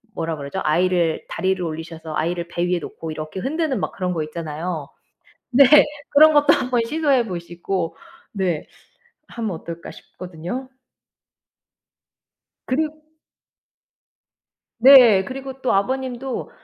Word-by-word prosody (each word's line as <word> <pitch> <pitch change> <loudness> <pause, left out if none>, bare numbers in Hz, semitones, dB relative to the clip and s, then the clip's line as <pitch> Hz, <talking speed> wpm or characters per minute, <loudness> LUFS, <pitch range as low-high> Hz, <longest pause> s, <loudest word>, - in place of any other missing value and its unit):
뭐라 165 -1 -2
그러죠? 140 +7 -5
아이를 170 +1 +1
다리를 190 +1 -1
올리셔서 160 -1 -6
아이를 170 +2 -2
배 175 0 -2
위에 180 0 +1
놓고 160 +1 -8
이렇게 155 +3 -6
흔드는 300 - -1
막 - - -3
그런 180 -1 -2
거 160 - -2
있잖아요. 155 0 -5 0.6
네 270 +2 +7 0.5
그런 310 +1 +7
것도 290 0 +5
한번 245 -2 0
시도해 280 -3 +1
보시고 175 -1 -4 0.4
네 185 -6 -2 0.6
하면 230 -3 -4
어떨까 170 0 -8
싶거든요. 180 +9 -8 2.0
그리 305 +5 0 1.9
네. 235 -6 +8
그리고 265 +3 -7
또 255 - +1
아버님도 260 +4 -2
185 Hz, 255 characters per minute, -21 LUFS, 165-255 Hz, 2.0 s, 네